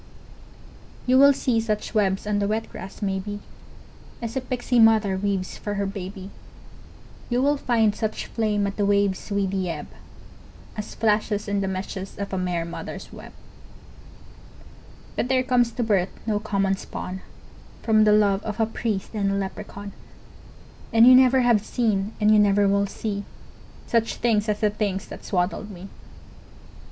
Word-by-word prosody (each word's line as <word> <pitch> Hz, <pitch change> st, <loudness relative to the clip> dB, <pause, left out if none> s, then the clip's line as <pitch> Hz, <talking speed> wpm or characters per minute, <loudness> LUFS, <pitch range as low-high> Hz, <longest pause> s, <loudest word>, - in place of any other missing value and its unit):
You 255 Hz, +1 st, +4 dB
will 280 Hz, +1 st, +8 dB
see 250 Hz, -4 st, +1 dB
such 215 Hz, -2 st, -2 dB
webs 195 Hz, -3 st, +1 dB
on 210 Hz, -1 st, 0 dB
the 200 Hz, -, 0 dB
wet 220 Hz, +2 st, -2 dB
grass, 195 Hz, +3 st, -8 dB
maybe, 200 Hz, +1 st, -2 dB, 0.8 s
As 230 Hz, +1 st, -5 dB
a 265 Hz, -, 0 dB
pixie 250 Hz, -1 st, 0 dB
mother 220 Hz, -3 st, +5 dB
weaves 190 Hz, -1 st, -2 dB
for 205 Hz, -1 st, -4 dB
her 200 Hz, 0 st, -1 dB
baby, 195 Hz, 0 st, -6 dB, 1.0 s
You 240 Hz, 0 st, +1 dB
will 285 Hz, +3 st, +3 dB
find 230 Hz, -6 st, +2 dB
such 220 Hz, -2 st, -3 dB
flame 210 Hz, -3 st, 0 dB
at 200 Hz, 0 st, -4 dB
the 205 Hz, -, +1 dB
wave's 200 Hz, -1 st, +1 dB
weedy 195 Hz, -2 st, -1 dB
ebb 150 Hz, -3 st, -4 dB, 0.9 s
As 210 Hz, -, -6 dB
flashes 210 Hz, -1 st, 0 dB
in 200 Hz, 0 st, 0 dB
the 195 Hz, -, -1 dB
meshes 190 Hz, 0 st, -5 dB
of 200 Hz, -1 st, -5 dB
a -, -, 0 dB
mer 175 Hz, -2 st, -1 dB
mother's 170 Hz, -, -7 dB
web, -, -, -11 dB, 1.8 s
But -, -, -1 dB
there 255 Hz, 0 st, +2 dB
comes 245 Hz, -2 st, +2 dB
to 245 Hz, -, -1 dB
birth 195 Hz, -4 st, +1 dB, 0.2 s
no 215 Hz, -2 st, 0 dB
common 195 Hz, -2 st, 0 dB
spawn 190 Hz, 0 st, -6 dB, 0.6 s
From 215 Hz, -2 st, +4 dB
the 210 Hz, -, +5 dB
love 205 Hz, -2 st, +3 dB
of 215 Hz, +1 st, -5 dB
a 225 Hz, -, +4 dB
priest 220 Hz, -3 st, -3 dB
and 200 Hz, -2 st, 0 dB
a 195 Hz, -, 0 dB
leprechaun, 200 Hz, +1 st, -5 dB, 1.0 s
And 230 Hz, 0 st, +6 dB
you 255 Hz, -, +9 dB
never 260 Hz, 0 st, +6 dB
have 235 Hz, -4 st, +3 dB
seen 215 Hz, -4 st, -1 dB
and 210 Hz, 0 st, +4 dB
you 215 Hz, -, +6 dB
never 205 Hz, 0 st, +4 dB
will 200 Hz, 0 st, +2 dB
see 200 Hz, 0 st, -4 dB, 0.6 s
Such 230 Hz, -1 st, 0 dB
things 220 Hz, -2 st, +1 dB
as 210 Hz, +1 st, -1 dB
the 210 Hz, -1 st, +3 dB
things 200 Hz, -2 st, -2 dB
that -, -, -9 dB
swaddled 185 Hz, +3 st, -1 dB
me! 195 Hz, 0 st, -10 dB
205 Hz, 165 wpm, -24 LUFS, 195-225 Hz, 1.8 s, you